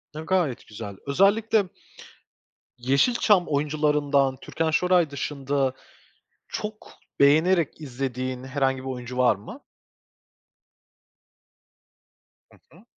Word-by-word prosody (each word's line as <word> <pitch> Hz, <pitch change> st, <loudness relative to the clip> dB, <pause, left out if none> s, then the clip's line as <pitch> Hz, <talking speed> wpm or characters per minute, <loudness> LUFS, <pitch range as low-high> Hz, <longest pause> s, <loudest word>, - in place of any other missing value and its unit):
A, -, -, -5 dB
gayet 160 Hz, -6 st, -1 dB
güzel. 105 Hz, -2 st, -8 dB
Özellikle, 205 Hz, +7 st, +3 dB, 1.1 s
Yeşilçam 180 Hz, -, +3 dB
oyuncularından 145 Hz, -2 st, +1 dB
Türkan 160 Hz, 0 st, -2 dB
Şoray 175 Hz, 0 st, +3 dB
dışında 140 Hz, -1 st, -2 dB, 0.7 s
çok 210 Hz, 0 st, -6 dB, 0.3 s
beğenerek 160 Hz, +3 st, +3 dB
izlediğin 130 Hz, -2 st, -4 dB
herhangi 135 Hz, 0 st, 0 dB
bir 130 Hz, +1 st, -7 dB
oyuncu 125 Hz, -1 st, -6 dB
var 125 Hz, -4 st, +4 dB
mı? 110 Hz, -, -11 dB, 2.9 s
Hı -, -, -20 dB, 0.2 s
hı. -, -, -19 dB
140 Hz, 90 wpm, -25 LUFS, 130-170 Hz, 2.9 s, var